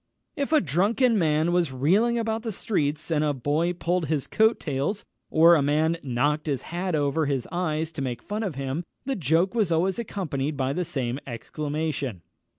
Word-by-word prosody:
_" - - -54 0.3
If 280 +1 -2
a 310 - +5
drunken 205 - +2
man 155 0 +2
was 175 -5 +2
reeling 195 - +2
about 225 -1 -1
the 225 -1 -3
streets, 155 -6 -1
and 155 -1 +2
a 145 -2 +1
boy 150 +7 0
pulled 175 -1 -1
his 150 -2 0
coat 220 +1 +3
tails, 150 +8 -2 0.2
or 165 +2 +6
a 160 - +4
man 155 +4 +2
knocked 145 +4 0
his 140 -4 -1
hat 180 0 -1
over 145 +1 +1
his 135 -3 -1
eyes 160 -2 -1
to 155 -3 -6
make 125 -3 -3
fun 210 +2 -3
of 195 -9 -3
him, 135 +4 -3 0.2
the 270 0 -1
joke 165 - +2
was 215 -7 +1
always 180 +5 +1
accompanied 155 -10 -3
by 135 0 0
the 180 +2 -1
same 135 -6 -2
exclamation. 145 - -3
160 Hz, 190 wpm, -26 LUFS, 145-185 Hz, 0.3 s, or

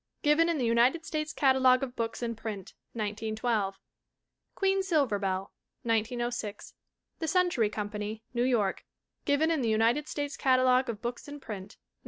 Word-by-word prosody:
Given 310 +3 +4
in 335 - +1
the 255 - 0
United 240 +8 +3
States 310 0 -2
Catalogue 260 -2 +4
of 255 -2 -5
Books 230 +1 -3
in 230 -1 -2
Print 210 -4 -6 0.2
(1912). 215 -1 -2 0.8
Queen 390 0 +2
Silverbell, 205 - 0 0.3
1906. 230 -1 -2 0.5
The 320 - -2
Century 350 - +2
Company, 210 +1 -4
New 240 - 0
York. 235 -6 +1 0.4
Given 300 +3 +2
in 320 -4 +1
the 230 - +1
United 230 +7 +2
States 290 -1 -3
Catalogue 255 -1 +3
of 220 -2 -5
Books 240 +3 -4
in 290 0 -8
Print 205 -5 -8
(1912). - - -54
240 Hz, 150 wpm, -29 LUFS, 215-285 Hz, 0.8 s, Given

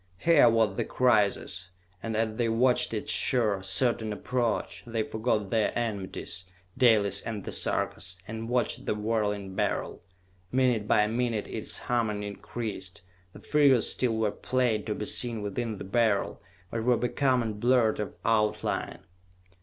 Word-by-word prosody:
Here 150 - +5
was 110 -4 +2
the - - +1
crisis, 105 -6 +1 0.3
and 110 -1 -3
as 110 -1 0
they 120 -2 +1
watched 125 +3 +3
its 110 -2 -2
sure, 110 -7 +2
certain 110 +3 0
approach, 120 +1 -2
they 115 -1 -1
forgot 110 -3 -1
their 110 -2 +2
enmities, 100 -5 -4 0.3
Dalis 110 -6 +3
and 105 -4 -5
the - - -6
Sarkas, 90 0 -1
and 110 +1 -5
watched 125 0 -1
the - - +1
whirling 105 -2 -1
Beryl. 100 0 -2 0.5
Minute 125 -5 +2
by 105 - +4
minute 115 -1 -1
its - - -3
humming 110 -4 -1
increased. 100 -2 -6 0.3
The - - -11
figures 140 -6 +4
still 120 -3 0
were 110 -2 +1
plain 120 -4 0
to 105 - -2
be 105 - -4
seen 115 -1 -1
within 110 +2 -3
the - - -7
Beryl, 105 0 +1 0.3
but 115 -1 -2
were 125 0 +3
becoming 125 -3 0
blurred 120 -2 +3
of 105 -3 -4
outline. 105 -1 0
110 Hz, 145 wpm, -28 LUFS, 105-120 Hz, 0.5 s, Here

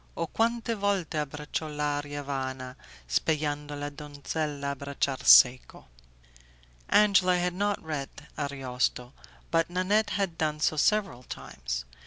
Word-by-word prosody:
O 165 - 0
quante 230 +5 0
volte 200 -6 -1
abbraccio 150 +2 -4
l'aria 145 -1 -3
vana 130 -2 -4 0.3
Speyando 150 - -1
la 145 0 -4
donzella 145 0 -4
abbracciar 140 -1 -3
seco'. 125 - +6 1.0
Angela 195 -3 +5
had 180 0 0
not 205 +2 0
read 150 -4 -4 0.3
Ariosto, 130 -3 -2 0.4
but 165 0 +2
Nanette 185 +5 +1
had 195 -5 -2
done 150 -1 0
so 155 - +2
several 195 - +1
times. - - -6
150 Hz, 115 wpm, -28 LUFS, 140-180 Hz, 1.0 s, seco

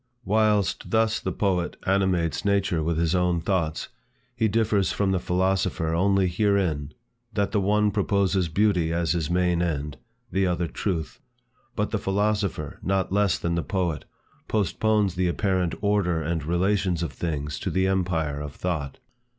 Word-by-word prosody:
Whilst 105 -2 +1
thus 110 0 +2
the - - -3
poet 90 -4 0
animates 95 -4 +1
nature 100 -5 +1
with 80 +1 -1
his 85 0 +1
own 90 -1 +2
thoughts, 80 -3 -1 0.5
he 115 -2 +2
differs 105 -2 +1
from 100 -2 0
the 95 - +1
philosopher 90 -2 0
only 95 +2 +3
herein, 90 -6 0 0.4
that 100 -2 0
the 105 - +1
one 105 +1 +2
proposes 100 -3 +1
Beauty 90 -2 +2
as 85 -2 0
his 85 -3 -1
main 90 -1 +2
end; 75 -5 -2 0.3
the 95 +1 +1
other 90 -1 0
Truth. 85 -1 -3 0.6
But - - -1
the - - 0
philosopher, 100 -6 -1
not 95 -1 0
less 100 -3 +2
than 85 - -2
the 85 - 0
poet, 90 -4 -2 0.4
postpones 105 -1 +1
the 90 0 0
apparent 90 -2 0
order 100 -5 +1
and 80 0 -2
relations 90 +1 +1
of 85 - -4
things 75 -3 -3
to - - -2
the 95 0 +1
empire 85 -6 0
of 75 -1 -7
thought. 75 -7 -3
90 Hz, 155 wpm, -25 LUFS, 85-100 Hz, 0.6 s, only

